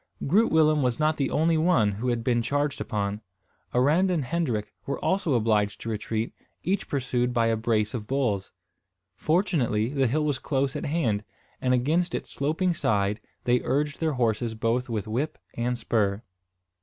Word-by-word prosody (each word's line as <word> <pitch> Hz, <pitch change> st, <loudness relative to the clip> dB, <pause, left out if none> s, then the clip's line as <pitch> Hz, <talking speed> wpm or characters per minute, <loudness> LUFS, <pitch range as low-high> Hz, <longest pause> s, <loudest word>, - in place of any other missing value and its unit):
Groot 205 Hz, +11 st, +3 dB
Willem 155 Hz, -2 st, +4 dB
was 125 Hz, 0 st, 0 dB
not 155 Hz, 0 st, +2 dB
the 140 Hz, -, 0 dB
only 160 Hz, +1 st, +2 dB
one 155 Hz, -, +3 dB
who 110 Hz, +6 st, -4 dB
had 120 Hz, -2 st, 0 dB
been 120 Hz, -1 st, +2 dB
charged 145 Hz, +3 st, -1 dB
upon. 105 Hz, 0 st, -2 dB, 0.5 s
Arend 150 Hz, +10 st, +3 dB
and 165 Hz, -7 st, 0 dB
Hendrik 120 Hz, -9 st, -2 dB
were 140 Hz, -, -1 dB
also 185 Hz, -7 st, +1 dB
obliged 105 Hz, -3 st, +1 dB
to 115 Hz, -, -4 dB
retreat, 110 Hz, +1 st, -2 dB, 0.3 s
each 195 Hz, +3 st, -1 dB
pursued 125 Hz, -2 st, -1 dB
by 115 Hz, -1 st, +3 dB
a 115 Hz, 0 st, +2 dB
brace 110 Hz, -1 st, 0 dB
of 110 Hz, -4 st, -4 dB
bulls. 115 Hz, -8 st, -1 dB, 0.6 s
Fortunately 130 Hz, -, +1 dB
the 135 Hz, -2 st, +1 dB
hill 150 Hz, +6 st, +1 dB
was 145 Hz, -4 st, 0 dB
close 135 Hz, -2 st, -1 dB
at -, -, -3 dB
hand, 120 Hz, -10 st, 0 dB, 0.4 s
and 125 Hz, -, +1 dB
against 165 Hz, +8 st, +1 dB
its -, -, -5 dB
sloping 160 Hz, +6 st, 0 dB
side 105 Hz, -7 st, 0 dB, 0.2 s
they 125 Hz, 0 st, +2 dB
urged 145 Hz, +2 st, -1 dB
their 160 Hz, -2 st, 0 dB
horses 115 Hz, -2 st, 0 dB
both 115 Hz, +3 st, 0 dB
with 110 Hz, -2 st, -2 dB
whip 125 Hz, +8 st, -2 dB, 0.2 s
and 120 Hz, +1 st, -1 dB
spur. 105 Hz, -3 st, 0 dB
125 Hz, 170 wpm, -26 LUFS, 110-150 Hz, 0.6 s, Willem